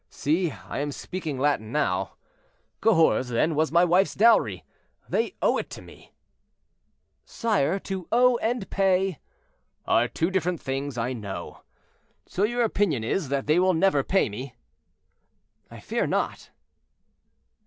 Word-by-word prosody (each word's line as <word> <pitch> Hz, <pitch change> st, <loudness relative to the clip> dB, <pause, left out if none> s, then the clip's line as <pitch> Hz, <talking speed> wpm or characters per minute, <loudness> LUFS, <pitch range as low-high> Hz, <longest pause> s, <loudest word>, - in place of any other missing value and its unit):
See, 165 Hz, +4 st, 0 dB
I 135 Hz, -, -7 dB
am 145 Hz, 0 st, -2 dB
speaking 160 Hz, -2 st, -5 dB
Latin 130 Hz, -6 st, 0 dB
now. 95 Hz, -10 st, -1 dB, 0.7 s
Cahors, 165 Hz, -, +3 dB
then, 140 Hz, +7 st, +1 dB
was 155 Hz, +1 st, +1 dB
my 170 Hz, +2 st, +5 dB
wife's 180 Hz, +3 st, +2 dB
dowry; 230 Hz, +3 st, +3 dB, 0.4 s
they 460 Hz, -, -1 dB
owe -, -, +3 dB
it -, -, -6 dB
to -, -, -9 dB
me—" -, -, -16 dB, 1.1 s
"Sire, 200 Hz, -, 0 dB
to 190 Hz, -3 st, -5 dB
owe 245 Hz, +1 st, +4 dB
and 230 Hz, -3 st, -2 dB
pay—" 190 Hz, -3 st, +1 dB, 0.7 s
"Are 120 Hz, +2 st, +3 dB
two 165 Hz, +8 st, -1 dB
different 180 Hz, -2 st, -1 dB
things, 135 Hz, -1 st, -4 dB
I 120 Hz, +2 st, -1 dB
know. 105 Hz, -5 st, -7 dB, 0.6 s
So 185 Hz, -, -5 dB
your 240 Hz, +3 st, +1 dB
opinion 195 Hz, -, 0 dB
is, 145 Hz, +6 st, -1 dB
that 140 Hz, -1 st, -1 dB
they 155 Hz, +4 st, +3 dB
will 185 Hz, -1 st, +3 dB
never 160 Hz, -4 st, +3 dB
pay 190 Hz, +6 st, +2 dB
me?" 120 Hz, +4 st, -7 dB, 1.1 s
"I -, -, -11 dB
fear -, -, -2 dB
not." -, -, -2 dB
165 Hz, 140 wpm, -25 LUFS, 135-195 Hz, 1.1 s, my